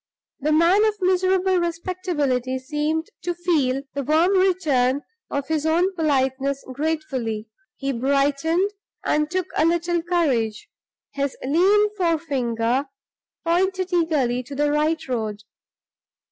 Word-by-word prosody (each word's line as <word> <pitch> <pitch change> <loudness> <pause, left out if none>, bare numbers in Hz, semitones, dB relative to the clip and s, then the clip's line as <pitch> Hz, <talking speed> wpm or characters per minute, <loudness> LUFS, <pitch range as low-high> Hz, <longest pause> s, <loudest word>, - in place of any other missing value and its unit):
The 300 +2 0
man 340 +7 +4
of 430 -1 +1
miserable 370 0 +2
respectability 330 -7 -1
seemed 300 +7 -2
to 350 -1 -2
feel 295 -7 +1
the 280 - -2
warm 315 +7 +3
return 305 -9 +2 0.3
of 280 -1 -3
his 315 -2 0
own 345 +5 +2
politeness 275 -3 0
gratefully; 260 -7 -2 0.3
he 275 -1 -2
brightened 280 - +1 0.3
and 300 0 +1
took 370 0 -1
a - - +3
little 340 +1 +1
courage. 275 -11 0 0.5
His 280 -1 -2
lean 400 +9 +3
forefinger 270 - 0 0.6
pointed 370 +2 +1
eagerly 295 -8 +1
to 265 +3 -9
the 290 +1 +1
right 310 +1 0
road. 215 -4 -3
310 Hz, 120 wpm, -23 LUFS, 270-350 Hz, 0.6 s, man